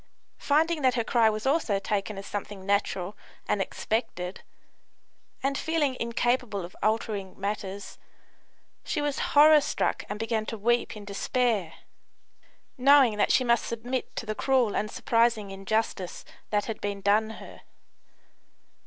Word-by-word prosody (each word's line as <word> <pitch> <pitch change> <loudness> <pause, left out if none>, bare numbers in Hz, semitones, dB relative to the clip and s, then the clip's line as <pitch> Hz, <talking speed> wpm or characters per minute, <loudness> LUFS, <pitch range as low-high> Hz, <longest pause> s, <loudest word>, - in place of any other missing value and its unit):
Finding 315 +2 +2
that 255 -2 +3
her 235 - +1
cry 225 -1 +3
was 215 +1 -3
also 270 -7 +2
taken 200 +1 -2
as 195 - -7
something 200 -1 -6
natural 200 -1 0 0.3
and 200 - +1
expected, 190 -4 -3 1.0
and 275 +1 +1
feeling 305 -5 0
incapable 235 -4 0
of 175 - -13
altering 215 -3 -1
matters, 200 0 -5 0.8
she - - -2
was 290 -1 -1 0.2
horror 300 +1 +8
struck - - -1
and 205 - -3
began 225 0 -2
to 225 - -4
weep 235 +1 0
in 205 - -10
despair, 205 -3 0 1.1
knowing 265 -4 +6
that - - +2
she 255 - +4
must 235 -1 +2
submit 245 +3 -4
to - - -4
the 215 - -2
cruel 255 -2 +1
and 215 - -1
surprising 230 -2 +1
injustice 195 -1 -2 0.2
that 205 -1 0
had 225 - -5
been 200 -1 -3
done 210 +2 +3
her. - - -12
220 Hz, 140 wpm, -27 LUFS, 200-250 Hz, 1.1 s, horror